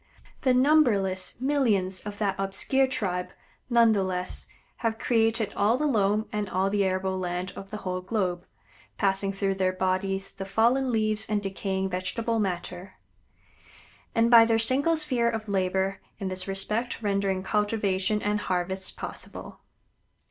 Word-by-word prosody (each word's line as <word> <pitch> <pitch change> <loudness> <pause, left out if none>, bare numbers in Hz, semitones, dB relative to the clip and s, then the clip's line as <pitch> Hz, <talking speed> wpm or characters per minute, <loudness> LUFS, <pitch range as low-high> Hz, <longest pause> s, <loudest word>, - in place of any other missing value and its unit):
The 255 -2 +3
numberless 235 -10 +3
millions 225 -9 +1
of 205 0 -6
that 205 -2 0
obscure 195 +8 +1
tribe, 180 -8 -2 0.4
none 235 -2 +5
the 205 -2 +2
less, 185 -1 -3 0.3
have 225 -1 -1
created 225 -2 +1
all 215 +4 +2
the 300 - 0
loam 215 -5 +2
and 210 -2 -2
all 190 +1 0
the 205 -1 +2
arable 190 0 -1
land 180 0 -3
of 195 - -9
the 215 - -5
whole 185 0 -2
globe, 180 -3 -2 0.5
passing 195 0 +1
through 195 0 -1
their 190 -1 +1
bodies 190 +1 -1
the 195 - -6
fallen 235 +7 +2
leaves 215 -1 0
and 210 -1 +1
decaying 190 0 -2
vegetable 225 +5 -1
matter; 180 -1 -4 1.2
and 230 +1 +3
by 230 -1 +10
their 225 0 +3
single 275 +8 +3
sphere 255 -6 +1
of 220 -1 -4
labor 190 0 0 0.2
in 195 - -3
this 185 0 -4
respect 215 +5 -2
rendering 195 -2 0
cultivation 210 -1 0
and 210 0 +1
harvests 190 0 -2
possible. - - -8
200 Hz, 150 wpm, -27 LUFS, 190-225 Hz, 1.2 s, by